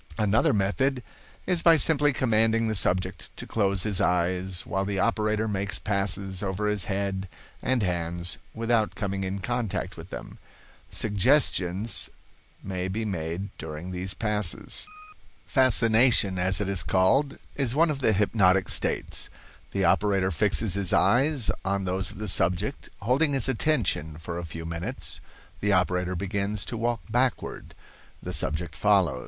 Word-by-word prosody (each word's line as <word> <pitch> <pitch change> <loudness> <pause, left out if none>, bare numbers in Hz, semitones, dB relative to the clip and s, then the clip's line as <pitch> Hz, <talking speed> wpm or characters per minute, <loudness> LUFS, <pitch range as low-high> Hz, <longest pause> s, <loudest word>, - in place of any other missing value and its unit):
"Another 105 +1 +3
method 125 +6 0 0.4
is 180 -3 +1
by 165 -1 +6
simply 145 -1 +3
commanding 115 -2 +2
the 110 - 0
subject 95 -1 0
to - - -7
close 100 -3 0
his 105 -3 +1
eyes, 90 0 0
while 95 0 -1
the 100 0 -3
operator 110 +1 +1
makes 100 -1 -1
passes 95 -1 -2
over 100 +1 -2
his 105 -3 +1
head 95 -1 -2 0.3
and 130 -4 +1
hands 85 -1 -3 0.2
without 115 -1 0
coming 100 -2 -3
in 95 +1 -3
contact 105 -3 -3
with 85 +2 -10
them. - - -9 0.5
Suggestions 105 -3 +1 0.5
may 95 -1 -3
be 110 +4 -3
made 90 0 -4
during 80 +3 -6
these 95 +1 -2
passes. 105 - -1 0.6
"Fascination, 115 -6 +3
as 95 +1 +1
it 105 - -2
is 100 -4 +1
called, 135 +10 +2 0.2
is 135 -3 -1
one 165 +1 +4
of 140 - -4
the 125 - +2
hypnotic 95 -2 +3
states. - - 0 0.4
The 95 -1 0
operator 95 0 +2
fixes 100 +3 +1
his 100 -2 +1
eyes 135 -1 +3
on 100 0 -1
those 95 +1 -1
of - - -10
the 105 +1 -5
subject. 90 +7 +1
Holding 135 +8 +2
his 135 -4 +2
attention 110 - 0
for 85 +1 -5
a 85 - -5
few 80 +1 -7
minutes, 85 +1 -6 0.4
the 105 0 +1
operator 90 0 +1
begins 100 +2 -2
to - - -5
walk 115 0 -1
backward; 125 +3 -2 0.5
the - - -4
subject 75 +2 0
follows. 95 -8 +3
100 Hz, 150 wpm, -26 LUFS, 95-115 Hz, 0.6 s, by